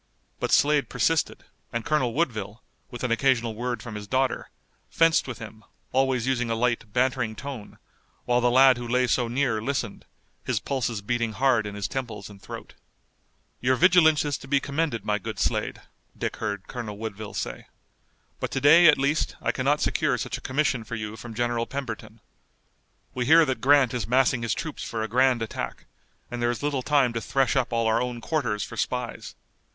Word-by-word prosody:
But - - -2
Slade 145 -1 +3
persisted, 150 +6 0 0.3
and 115 -1 -3
Colonel 130 -7 +1
Woodville, 110 - -2 0.3
with 120 - -8
an 125 - 0
occasional 115 -2 +2
word 120 +2 -3
from 120 - -7
his 105 -1 -7
daughter, 130 +2 0 0.4
fenced 165 -3 +3
with 130 - -5
him, 110 -1 -10 0.3
always 130 -2 +1
using 125 -2 0
a 115 - 0
light 115 -2 -1
bantering 125 -2 0
tone, 135 -4 -8 0.5
while 125 0 +2
the 120 - +3
lad 130 0 +6
who 120 0 -5
lay 125 +2 +2
so 120 0 +1
near 120 -3 0
listened, 125 -3 -3 0.4
his - - 0
pulses 120 -6 -2
beating 115 0 -1
hard 125 -4 +2
in 100 - -7
his 100 -1 -2
temples 115 -6 -5
and 100 -1 -15
throat. - - -9 0.9
"Your 130 +1 +2
vigilance 160 -2 +5
is 145 -1 -2
to 135 - -12
be 140 +1 +3
commended, 140 -5 -2
my 105 -1 0
good 95 - -6
Slade," - - -1 0.4
Dick - - -3
heard 100 -3 -4
Colonel 110 -4 -6
Woodville 110 -1 -6
say, - - -5 0.7
"but - - -2
to - - -2
day 165 +5 +7
at 150 - +7
least 140 +3 0
I - - 0
cannot - - +1
secure - - +1
such - - -3
a - - -7
commission 130 -3 0
for 115 - -6
you 110 0 -5
from 115 +1 -9
General 120 0 0
Pemberton. 115 -5 -6 0.9
We 125 -1 -2
hear 160 +2 +7
that 130 -3 -2
Grant 135 -3 +5
is 120 -5 -2
massing 130 0 +3
his 115 -2 -1
troops 155 -2 -5
for 110 -1 -3
a - - -2
grand 125 +1 +3
attack, 110 - -5 0.5
and 120 0 -4
there 120 - +2
is 120 +3 -3
little 145 -3 0
time 135 -3 +2
to 115 - -2
thresh 135 +2 +1
up 130 -2 +1
all 115 -1 +1
our 110 0 +2
own 125 -1 -3
quarters 115 -6 -1
for - - -7
spies. - - -3
125 Hz, 190 wpm, -26 LUFS, 115-135 Hz, 0.9 s, day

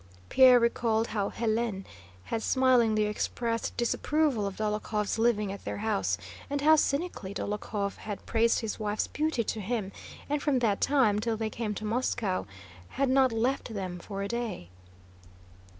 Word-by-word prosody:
Pierre 255 -2 +7
recalled 230 -1 +1
how 205 -2 -1
Hélène 220 -3 -1 0.4
had 225 - -3
smilingly 240 -4 +3
expressed 230 +2 -2
disapproval 250 -1 +1
of 195 - -5
Dólokhov's 210 0 -1
living 215 -4 +2
at 200 - -8
their - - -4
house, 95 - 0 0.3
and 285 0 -1
how 310 +2 +7
cynically 280 - -1
Dólokhov 205 0 -3
had 205 -2 -7
praised 230 +1 +2
his 225 -1 -4
wife's 210 0 -1
beauty 305 -5 -1
to 220 0 -3
him 205 -1 -2 0.4
and 290 0 -1
from 290 -3 +2
that 220 -5 +1
time 250 -8 +3
till 225 +1 -1
they 220 0 -2
came 215 -2 -3
to 215 - -5
Moscow 215 - -1 0.5
had 275 -1 +2
not 260 -1 +4
left 235 0 -1
them 185 -3 -4
for 195 +2 -5
a - - -2
day. 230 - -4
225 Hz, 155 wpm, -29 LUFS, 210-245 Hz, 0.5 s, Pierre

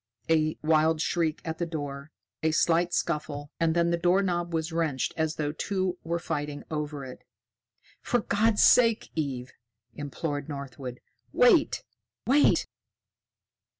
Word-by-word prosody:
A 155 -1 +2
wild 160 0 +3
shriek 165 -1 0
at 160 0 -4
the 170 - 0
door, 145 -2 -5 0.3
a 160 - +2
slight 170 +2 +2
scuffle, 150 -4 -2
and 165 0 +2
then 170 0 +2
the 170 - 0
doorknob 175 -1 +1
was 160 0 -2
wrenched 160 -6 -1
as 160 -1 -1
though 150 -1 -1
two 185 +2 -2
were 170 +1 -1
fighting 145 -3 -4
over 150 -2 -3
it. 125 - -10 0.8
"For 245 - +1
God's 210 +1 +2
sake, 230 -3 +5
Eve!" 135 -5 -3 0.4
implored 145 +2 -4
Northwood. 135 -3 -7 0.3
"Wait! 445 -12 +4 0.4
Wait!" 285 +4 +4
160 Hz, 130 wpm, -27 LUFS, 145-175 Hz, 0.8 s, sake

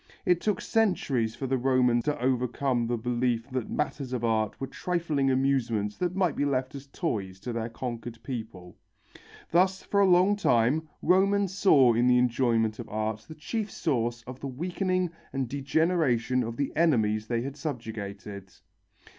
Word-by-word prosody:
It 180 -1 +3
took 210 -3 0
centuries 140 - +1
for 135 - -5
the 130 0 0
Roman 125 -2 +3
to 150 +3 -2
overcome 125 -1 0
the 120 0 0
belief 120 0 -1
that 130 -3 -3
matters 140 -3 -3
of 120 -2 -2
art 110 -2 0
were 135 - -2
trifling 160 -4 -1
amusements 130 -6 +1
that 180 0 -1
might 185 -5 +1
be - - 0
left 130 -2 -1
as 140 0 -9
toys 100 - -3
to 120 - -4
their 115 0 -3
conquered 120 -1 -6
people. 110 -8 -7 0.8
Thus 185 +3 +3
for 200 - 0
a 200 - +5
long 185 +3 +5
time 145 - +2
Romans 195 +2 +3
saw 140 - +5
in 120 +2 +2
the 125 0 +5
enjoyment 120 -3 +1
of - - -7
art 110 0 -3
the 155 - -9
chief 210 +8 -3
source 120 -9 -1
of 125 +2 -9
the 140 - -5
weakening 180 +5 -1 0.2
and 135 -2 -1
degeneration 140 -2 +1
of 115 -1 -4
the 140 - -2
enemies 110 -10 +2
they 115 0 0
had 140 +1 -5
subjugated. 105 -8 -6
130 Hz, 165 wpm, -28 LUFS, 115-160 Hz, 0.8 s, a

